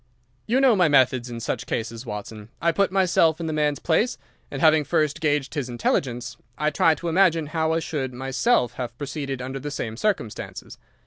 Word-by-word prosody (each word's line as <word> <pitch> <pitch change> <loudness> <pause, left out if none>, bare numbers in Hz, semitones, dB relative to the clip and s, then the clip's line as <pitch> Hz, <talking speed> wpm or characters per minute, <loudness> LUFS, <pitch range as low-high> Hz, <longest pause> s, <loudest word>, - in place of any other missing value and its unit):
"You 245 +4 +2
know 265 -4 +5
my 180 -4 +4
methods 130 -4 +3
in 120 -1 -6
such 115 - -3
cases, 115 +2 -4
Watson. 105 0 -7
I 170 - +2
put 195 +3 +1
myself 175 -4 +3
in 165 - -4
the 160 - -2
man's 150 -1 +1
place 175 - +1 0.3
and, 135 - -5
having 155 0 +5
first 155 -1 0
gauged 145 -3 0
his 140 -5 -3
intelligence, 120 +1 -1 0.2
I 150 +1 +1
try 160 +2 +3
to 175 - -6
imagine 165 -2 +3
how 160 -1 +1
I 165 - 0
should 140 -5 -3
myself 130 - +1
have 120 -1 -5
proceeded 140 -2 -4
under 130 +1 -5
the 145 +3 -5
same 115 -6 -4
circumstances. 130 - -3
145 Hz, 190 wpm, -24 LUFS, 125-165 Hz, 0.3 s, know